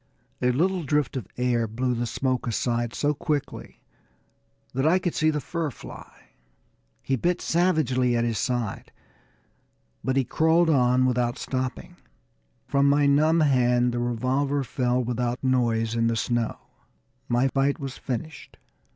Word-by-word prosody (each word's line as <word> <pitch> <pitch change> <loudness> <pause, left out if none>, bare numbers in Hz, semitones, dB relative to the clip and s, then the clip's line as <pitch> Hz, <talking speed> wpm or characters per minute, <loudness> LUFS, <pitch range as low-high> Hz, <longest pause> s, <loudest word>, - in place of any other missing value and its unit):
A 125 - +3
little 180 +8 +1
drift 150 -4 0
of 125 -8 -4
air 120 -2 +1
blew 125 +4 -1
the 120 0 -2
smoke 130 +1 -1
aside 120 0 -1
so 145 0 +1
quickly 150 -2 -4 0.9
that 135 +3 +1
I 175 +3 +4
could 180 -2 -2
see 155 - +2
the 150 -1 0
fur 165 +3 -3
fly. 130 - -13 0.7
He 135 - 0
bit 175 +8 0
savagely 135 -8 +1
at 115 - +1
his 115 -2 -1
side, 120 -5 -3 1.1
but 130 - 0
he 135 - +3
crawled 160 +5 +3
on 125 -2 +3
without 125 0 0
stopping. 130 -1 -4 0.7
From 140 0 +2
my 145 0 +3
numb 155 +4 +4
hand 125 -4 +3
the 120 - -2
revolver 130 +4 0
fell 125 0 0
without 120 +1 -2
noise 115 -3 +1
in 115 0 +1
the 115 - +1
snow 120 0 -1 0.7
my 120 +2 +2
fight 135 +1 0
was 135 -2 -6
finished. 150 +5 -6
130 Hz, 145 wpm, -25 LUFS, 120-145 Hz, 1.1 s, I